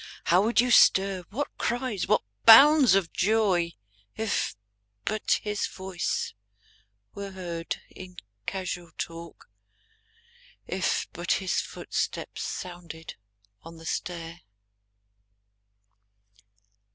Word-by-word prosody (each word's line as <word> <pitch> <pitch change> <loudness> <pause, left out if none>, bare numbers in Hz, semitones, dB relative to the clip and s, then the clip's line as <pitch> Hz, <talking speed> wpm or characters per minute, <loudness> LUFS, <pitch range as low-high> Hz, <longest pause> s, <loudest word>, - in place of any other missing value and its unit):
How 180 +2 +4
would 225 +2 +2
you 245 +1 +3
stir, 190 -4 +5
what 280 +7 -4
cries, 240 -5 -1
what - - +3 0.2
bounds 275 0 +9
of 190 -4 0
joy. 190 -5 +2 0.4
If 220 - -1 0.5
but 215 -1 0
his 210 -1 -1
voice 190 -2 -3 0.8
were 200 0 -6
heard 170 -3 -5
in 180 -1 -11 0.3
casual 185 -3 -4
talk. 165 -8 -8 1.1
If - - -1
but - - 0
his - - 0
footstep - - -4
sounded 170 -3 -7 0.5
on 165 0 -12
the 165 - -13
stair! 165 0 -5
185 Hz, 95 wpm, -27 LUFS, 170-215 Hz, 1.1 s, bounds